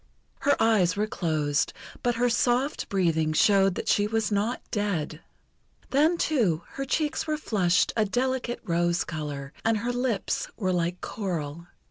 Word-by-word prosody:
Her 285 - +3
eyes 210 -6 +3
were 210 +1 +1
closed, 155 -7 0 0.3
but 240 -1 +1
her 245 +1 +2
soft 245 +4 +1
breathing 165 -5 +1
showed 195 +2 +4
that - - -4
she 205 0 +3
was 220 0 0
not 210 +4 0
dead. 180 -7 -2 0.7
Then, 310 +5 +3
too, 210 - +1
her 275 - -5
cheeks 305 +3 -1
were 305 0 0
flushed 180 - +1
a 220 - +3
delicate 245 +3 -1
rose 175 -3 +1
colour, 150 -3 -5
and 225 -1 +2
her 240 +3 -2
lips 245 -5 -1
were 185 -4 0
like 175 +1 -1
coral. 170 -5 -4
205 Hz, 150 wpm, -27 LUFS, 170-245 Hz, 0.7 s, showed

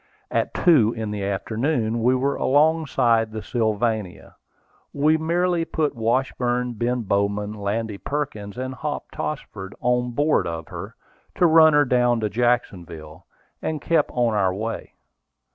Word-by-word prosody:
At - - -1
two 135 - +4
in 110 -2 -3
the 105 -1 -4
afternoon 115 +4 -1
we 125 +3 +3
were 135 +2 0
alongside 135 -6 +2
the 110 -1 -6
Sylvania. 110 -3 -2 0.6
We 150 +2 +3
merely 170 +2 +1
put 155 -2 -1
Washburn, 125 +1 0
Ben 120 +2 -1
Bowman, 100 +1 -1
Landy 105 0 -3
Perkins, 120 -8 -4
and 130 +1 -4
Hop 150 +2 -5
Tossford 100 -10 -6
on 125 0 0
board 145 - +2
of 80 -1 -5
her, - - -8 0.4
to 180 - +3
run 160 -1 +6
her 145 0 +5
down 120 -1 +2
to 105 - 0
Jacksonville, 90 -10 -2 0.3
and 155 -1 -2
kept 160 0 +1
on 120 -2 +1
our 95 -3 +1
way. 110 +3 -5
120 Hz, 140 wpm, -23 LUFS, 105-145 Hz, 0.6 s, run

